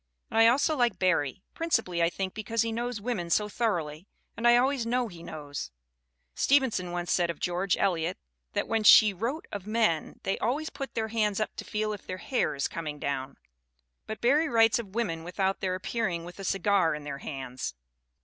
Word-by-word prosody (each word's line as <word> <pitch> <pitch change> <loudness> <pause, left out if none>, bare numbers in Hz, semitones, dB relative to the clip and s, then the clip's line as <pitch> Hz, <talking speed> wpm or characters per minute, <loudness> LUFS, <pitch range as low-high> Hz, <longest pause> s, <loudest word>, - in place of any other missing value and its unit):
And 225 - +2
I 225 - +8
also 285 +6 +3
like 240 -7 +2
Barrie; 180 -3 +1
principally, 225 - 0
I 170 - +4
think, 190 +1 -4
because 220 +1 -1
he 230 - -2
knows 240 0 -3
women 205 -6 -3
so 210 +5 +2
thoroughly, 180 -7 -2 0.3
and 235 - +1
I 240 0 +7
always 260 0 +2
know 240 0 0
he 170 -3 -11
knows. 145 - -6 0.6
Stevenson 260 - +2
once 175 0 -3
said 175 -2 +2
of 170 - -4
George 180 +1 0
Eliot 175 -2 0 0.4
that - - -1
when 225 -1 0
she 210 0 +8
wrote 235 - -3
of 205 -2 -6
men 215 -8 0
they 195 - -1
always 285 +8 -1
put 275 -2 -6
their 220 -1 -1
hands 215 -2 +1
up 215 - -2
to - - -4
feel 215 0 -2
if 205 - -9
their 185 - -4
hair 250 - -1
is 140 - 0
coming 155 -3 -5
down; 140 -2 -3 0.7
but 220 - -6
Barrie 295 +6 +3
writes 225 0 +4
of 205 -3 -8
women 165 -9 -1
without 190 +2 -1
their 185 -1 -1
appearing 185 -3 -2
with 175 +3 -11
a - - -6
cigar 195 -4 +2
in 150 - -7
their 140 -1 -5
hands." 130 - -5
200 Hz, 195 wpm, -28 LUFS, 170-230 Hz, 0.7 s, I